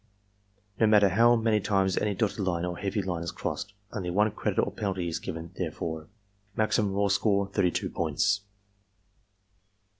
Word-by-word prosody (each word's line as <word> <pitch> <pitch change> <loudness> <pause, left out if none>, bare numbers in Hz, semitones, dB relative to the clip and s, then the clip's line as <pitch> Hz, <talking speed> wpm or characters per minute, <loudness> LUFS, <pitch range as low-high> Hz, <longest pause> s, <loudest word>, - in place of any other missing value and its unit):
(No 110 - +5
matter 105 -2 +6
how 115 +6 +5
many 110 -2 +2
times 95 -2 +1
any 105 -1 0
dotted 110 +1 -1
line 90 -3 0
or 90 0 -3
heavy 100 +2 -2
line 90 -3 -2
is 85 - -3
crossed, 100 -1 -4 0.2
only 95 -4 -3
one 105 +4 +2
credit - - -2
or - - +1
penalty 95 -4 -2
is 85 0 -2
given 80 +1 -6
therefor.) 80 -2 -4 0.5
Maximum 105 -2 +1
raw 100 +1 +1
score, 100 0 +2
32 90 -4 0
points. 95 +6 +1
100 Hz, 155 wpm, -28 LUFS, 90-105 Hz, 0.5 s, matter